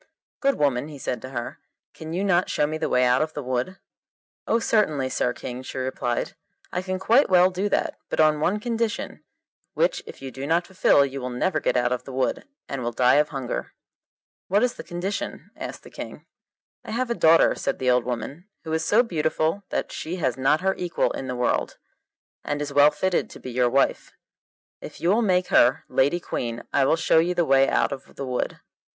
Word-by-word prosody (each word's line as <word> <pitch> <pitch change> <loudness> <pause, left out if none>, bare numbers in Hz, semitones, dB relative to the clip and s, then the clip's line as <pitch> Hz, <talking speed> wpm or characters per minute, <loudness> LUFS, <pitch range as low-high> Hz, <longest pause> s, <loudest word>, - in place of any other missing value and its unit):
'Good 275 0 +2
woman,' 140 -2 +1
he 150 -2 -9
said 125 -3 -4
to 130 - -8
her, 120 -3 -5 0.3
'can 160 0 -8
you 180 +4 -1
not 180 -3 +2
show 150 - +1
me 155 +1 -3
the - - -1
way 125 0 +3
out 125 +2 +3
of 155 0 -2
the 145 - -4
wood?' 130 +9 -2 0.7
'Oh, 230 - +3
certainly, 155 - +1
Sir 125 - 0
King,' 125 0 -7
she 130 - -8
replied, 130 -2 -2 0.4
'I 180 - -1
can 185 0 -3
quite 230 +8 +3
well 185 0 +5
do 190 +3 -1
that, - - -1
but - - -3
on 155 -1 +4
one 185 +7 +1
condition, 230 0 -3 0.5
which - - +1
if - - -10
you 135 -1 -7
do 135 +2 -6
not 170 +2 +2
fulfil 180 -6 +4
you 135 0 -6
will 125 - -3
never 155 +7 0
get - - 0
out 120 0 +1
of 125 - -2
the - - -8
wood, 130 0 -1 0.2
and 135 - -4
will 120 0 -2
die 125 +3 +4
of 150 0 +3
hunger.' 135 -4 -4 0.7
'What 200 +5 +2
is 250 - +1
the - - -9
condition?' 185 +4 -5
asked - - -7
the - - -14
King. - - -9 0.6
'I - - -11
have 245 +1 -1
a - - +3
daughter,' 165 -6 +5
said - - -2
the 125 -1 +2
old 125 -1 +3
woman, 125 - -5 0.2
'who 160 - -4
is 160 0 0
so 215 +8 +4
beautiful 160 0 -1
that - - -2
she 165 +3 -5
has 130 -9 -1
not 135 +4 +2
her 190 +1 +2
equal 175 -1 0
in 135 - -5
the 125 - -3
world, 125 0 -1 0.7
and 145 0 -2
is 145 -1 -4
well 145 +1 +7
fitted 185 +3 -1
to - - -12
be 130 - -7
your 125 0 +2
wife; 135 +3 +1 0.7
if - - -9
you 170 - 0
will 215 +5 +4
make 185 -4 +1
her 125 +2 +4
lady 135 +6 +2
queen 120 -7 -4
I 140 - +4
will 150 - +3
show 160 0 +3
you 175 +2 +1
the 175 -1 +2
way 135 -1 +4
out - - +1
of 135 -1 -8
the 140 - -5
wood. 125 -1 -3
150 Hz, 220 wpm, -24 LUFS, 130-185 Hz, 0.7 s, well